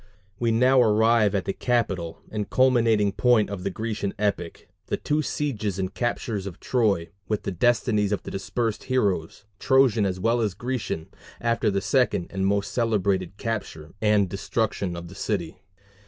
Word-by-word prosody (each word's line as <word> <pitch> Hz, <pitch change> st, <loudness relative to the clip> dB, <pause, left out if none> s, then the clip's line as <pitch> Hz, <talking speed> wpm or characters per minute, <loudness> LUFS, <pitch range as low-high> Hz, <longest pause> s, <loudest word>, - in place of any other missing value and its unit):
We 120 Hz, -, +1 dB
now 125 Hz, +3 st, +4 dB
arrive 110 Hz, -1 st, +4 dB
at 95 Hz, -, -1 dB
the 95 Hz, -, -1 dB
capital 95 Hz, -10 st, -1 dB
and 105 Hz, -1 st, -3 dB
culminating 115 Hz, -5 st, +3 dB
point 115 Hz, -1 st, +3 dB
of 95 Hz, -3 st, -5 dB
the -, -, -1 dB
Grecian 105 Hz, -1 st, -3 dB
epic 100 Hz, -5 st, -2 dB, 0.2 s
the -, -, -1 dB
two 150 Hz, +1 st, 0 dB
sieges 110 Hz, -10 st, -2 dB
and 95 Hz, -1 st, -3 dB
captures 115 Hz, -4 st, -2 dB
of 90 Hz, -, -8 dB
Troy, 105 Hz, -9 st, +1 dB, 0.2 s
with 105 Hz, -1 st, -1 dB
the -, -, -2 dB
destinies 105 Hz, +1 st, +2 dB
of 105 Hz, -, -1 dB
the -, -, -7 dB
dispersed 110 Hz, +3 st, -2 dB
heroes, 100 Hz, -8 st, -1 dB
Trojan 130 Hz, -6 st, +4 dB
as 95 Hz, -1 st, -3 dB
well 115 Hz, +4 st, +1 dB
as 105 Hz, -5 st, -1 dB
Grecian, 115 Hz, -8 st, -4 dB, 0.3 s
after 115 Hz, -1 st, +1 dB
the 100 Hz, -1 st, 0 dB
second 105 Hz, -3 st, +1 dB
and 95 Hz, 0 st, 0 dB
most 100 Hz, 0 st, 0 dB
celebrated 100 Hz, -5 st, 0 dB
capture 100 Hz, -9 st, -5 dB
and 105 Hz, -2 st, +3 dB
destruction 100 Hz, -1 st, -2 dB
of 85 Hz, 0 st, -7 dB
the 90 Hz, -, -11 dB
city. 95 Hz, -4 st, -3 dB
105 Hz, 165 wpm, -25 LUFS, 95-115 Hz, 0.3 s, now